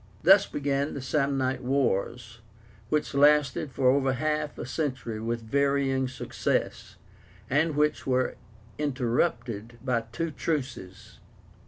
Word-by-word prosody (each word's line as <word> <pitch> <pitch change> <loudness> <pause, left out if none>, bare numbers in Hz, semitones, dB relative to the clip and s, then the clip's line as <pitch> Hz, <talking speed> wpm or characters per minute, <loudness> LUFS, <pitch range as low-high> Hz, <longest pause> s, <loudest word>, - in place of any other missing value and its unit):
Thus 195 +4 +7
began 140 0 -1
the 140 - -4
SAMNITE 135 -2 0
WARS, 120 -3 -1 0.5
which 150 -1 0
lasted 145 0 +3
for 130 0 +3
over 135 -1 +2
half 150 +2 -1
a - - -5
century 130 -5 -3
with 115 +1 -2
varying 140 +1 +1
success, 125 - -2 0.6
and 150 +2 +2
which 150 -1 +1
were 130 -1 +1 0.5
interrupted 120 -4 -1
by 120 -3 0
two 165 +7 -2
truces. 130 - -4
135 Hz, 115 wpm, -27 LUFS, 125-145 Hz, 0.6 s, Thus